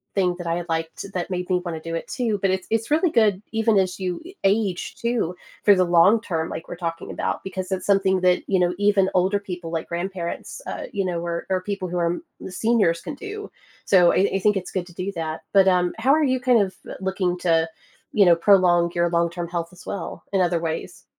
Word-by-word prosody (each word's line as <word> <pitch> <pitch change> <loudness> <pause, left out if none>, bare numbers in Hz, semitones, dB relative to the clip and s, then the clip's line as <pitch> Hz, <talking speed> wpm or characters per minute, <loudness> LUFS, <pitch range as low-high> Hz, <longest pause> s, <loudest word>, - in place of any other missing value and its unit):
thing 185 -3 +2
that 175 - -5
I 170 +1 -1
liked 165 +3 -3
that 180 0 -3
made 180 -1 -3
me 180 -1 +2
want 170 -3 -4
to 165 - -12
do 165 - -2
it 165 - -4
too, 230 -5 -1
but 195 - +2
it 190 -1 -1
it's 225 0 0
really 315 +3 +3
good 210 - +3
even 225 -1 +2
as 185 0 +1
you 180 -2 -2 0.2
age 195 -2 0
too 235 -7 -1 0.3
for 205 - +7
the 185 - +3
long 175 +5 +5
term 165 -6 -3
like - - -6
we're - - -6
talking 165 -1 -4
about, - - -3
because 190 0 -5
it's 190 -1 -2
something 195 -2 +3
that, 180 -1 +3
you 190 - +2
know, 175 0 +2
even 205 -2 +3
older 185 +3 +2
people 180 -4 -7
like 165 -1 -3
grandparents, 175 - -5
uh, - - -5
you 195 -2 -1
know, 175 -2 -1
o 170 0 -2
or 185 -1 +1
people 200 -2 -3
who 180 - -3
are 170 0 +1 0.3
seniors 200 -5 +1
can 295 - -6
do. 415 +5 -7 0.3
So, 180 -3 +5
I 195 +2 +3
I - - +1
think 210 +1 +2
it's 185 - -5
good 185 -2 -3
to 175 - -14
do 185 +2 -3
that, 160 -1 -4
but, 195 -1 +6
um, 180 -1 +3
how 260 +4 +3
are 315 - +2
you, 260 -2 +2
kind 250 -2 +4
of, 190 -1 -2 0.2
looking 190 -2 -1
to, 165 -2 +2 0.4
you 205 - +5
know, 175 -1 +6
prolong 175 -2 +4
your 170 0 +2
long-term 170 0 0
health 170 -1 -3
as 180 - -15
well, 185 -4 -6
in 195 - +3
other 175 -1 +2
ways? 160 -1 -5
185 Hz, 230 wpm, -23 LUFS, 175-200 Hz, 0.4 s, for